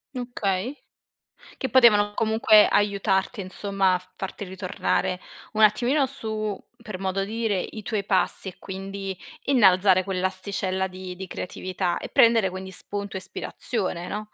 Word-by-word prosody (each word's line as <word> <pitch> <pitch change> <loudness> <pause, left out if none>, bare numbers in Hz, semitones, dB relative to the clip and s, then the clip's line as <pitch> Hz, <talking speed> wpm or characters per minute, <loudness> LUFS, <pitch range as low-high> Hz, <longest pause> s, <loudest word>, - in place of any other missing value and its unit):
Okay, 240 -1 -2 0.8
che 265 - -3
potevano 215 -4 +5
comunque 220 -1 +5
aiutarti 200 +1 +1
insomma 195 0 0
a 185 +1 -7
farti 195 +1 -6
ritornare 185 -1 -2 0.3
un 215 - 0
attimino 245 +7 +4
su 215 -6 -4 0.2
per 210 -5 -7
modo 195 0 -1
dire, 220 -2 -1
i 215 - -7
tuoi 210 -1 -2
passi 190 0 +2
e - - -14
quindi 195 0 -6 0.3
innalzare 190 -7 +5
quell'asticella 190 0 -2
di 185 -1 -8
di 190 0 -7
creatività 180 0 -3
e - - -7
prendere 230 -4 +5
quindi 190 +1 -7
spunto 200 +2 -4
e - - -2
ispirazione, 185 -2 -3
no? 210 0 -6
195 Hz, 135 wpm, -25 LUFS, 185-215 Hz, 0.8 s, potevano